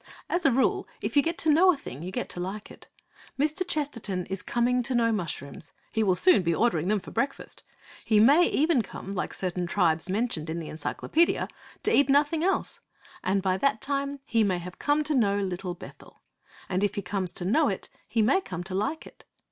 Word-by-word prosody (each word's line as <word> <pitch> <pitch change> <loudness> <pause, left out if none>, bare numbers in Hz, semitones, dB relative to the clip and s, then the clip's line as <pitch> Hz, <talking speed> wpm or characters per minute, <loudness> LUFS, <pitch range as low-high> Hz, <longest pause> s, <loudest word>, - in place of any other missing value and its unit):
As 350 -3 +2
a - - +4
rule, 260 +2 +1
if - - -4
you 285 - +7
get 330 +4 -2
to 315 - +3
know 360 +5 +6
a 325 - -3
thing, 145 - -9
you 180 +2 -5
get - - -3
to - - -6
like 195 +4 -5
it. - - -14 0.5
Mr. 310 +5 +1
Chesterton 230 - -2
is 195 -1 -3
coming 245 +3 +1
to 250 +1 0
know 230 -1 +3
mushrooms. 155 -7 -5 0.2
He 220 - 0
will 190 -4 +3
soon 360 - +5
be 170 -2 0
ordering 175 -8 +1
them 210 +1 +2
for - - -11
breakfast. 275 0 -3 0.4
He 215 -2 +3
may 285 +11 +6
even 305 -3 +2
come, 195 -1 -8
like 195 - -3
certain 180 -1 -2
tribes 165 0 +1
mentioned 190 -6 -1
in 160 - -3
the 165 -2 -6
Encyclopaedia, 310 - 0 0.4
to 435 - +3
eat 280 - +4
nothing 295 +3 +3
else! 385 +2 0 0.4
And 195 +1 +1
by 190 -1 +1
that 275 -3 +1
time 280 +2 -2
he 230 -1 +2
may 190 -3 +1
have 180 +1 -9
come 295 +1 +2
to 300 +1 0
know 205 -7 +2
Little 185 -2 -3
Bethel. - - -14 0.4
And 190 +1 -1
if 205 - 0
he 200 - -3
comes 185 -1 -2
to 175 - -3
know 285 - +3
it, 190 - -4 0.2
he 220 0 +2
may 380 - +3
come 180 - -6
to 185 +1 -7
like 280 - -2
it. - - -15
215 Hz, 215 wpm, -27 LUFS, 185-285 Hz, 0.5 s, you